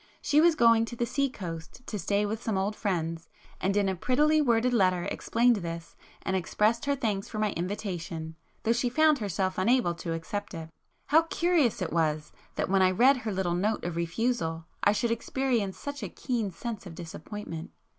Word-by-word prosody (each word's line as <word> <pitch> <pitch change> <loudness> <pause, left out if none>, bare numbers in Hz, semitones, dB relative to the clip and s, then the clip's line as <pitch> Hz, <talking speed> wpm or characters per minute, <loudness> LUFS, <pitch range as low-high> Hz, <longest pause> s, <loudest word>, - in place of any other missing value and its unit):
She 295 +1 +3
was 335 0 +5
going 230 -4 +5
to 235 - -7
the 240 - 0
sea 275 +3 0
coast 170 +1 -8
to 210 - -4
stay 200 +4 +1
with 220 +2 -3
some 220 -5 -1
old 200 +2 -1
friends, 165 -6 -2 0.3
and 195 +2 0
in 200 -1 +3
a 190 - 0
prettily 300 - +3
worded 245 -2 +2
letter 185 -5 +3
explained 235 +4 +2
this, 170 -2 -6 0.3
and 190 - -1
expressed 215 +6 +1
her 280 0 +2
thanks 210 -7 -2
for - - -6
my 215 -1 +1
invitation, 170 -3 -4 0.3
though 230 - +3
she 240 +1 0
found 310 +2 +4
herself 190 -3 -1
unable 225 -2 +3
to 170 0 -4
accept 195 +4 -4
it. 160 -1 -7 0.4
How 310 +3 +7
curious 330 - +1
it 160 - -4
was 155 -2 0 0.2
that - - -1
when 195 0 +3
I 185 - +6
read 255 +9 +5
her 225 -3 -3
little 185 -3 0
note 205 +5 0
of 175 -1 -3
refusal 170 -1 -1 0.2
I 205 - +6
should 230 +3 0
experience 235 -4 -1
such 285 0 -6
a - - -4
keen 235 -6 -2
sense 205 +2 -6
of 165 - -9
disappointment! 165 +1 -7
205 Hz, 195 wpm, -28 LUFS, 175-240 Hz, 0.4 s, How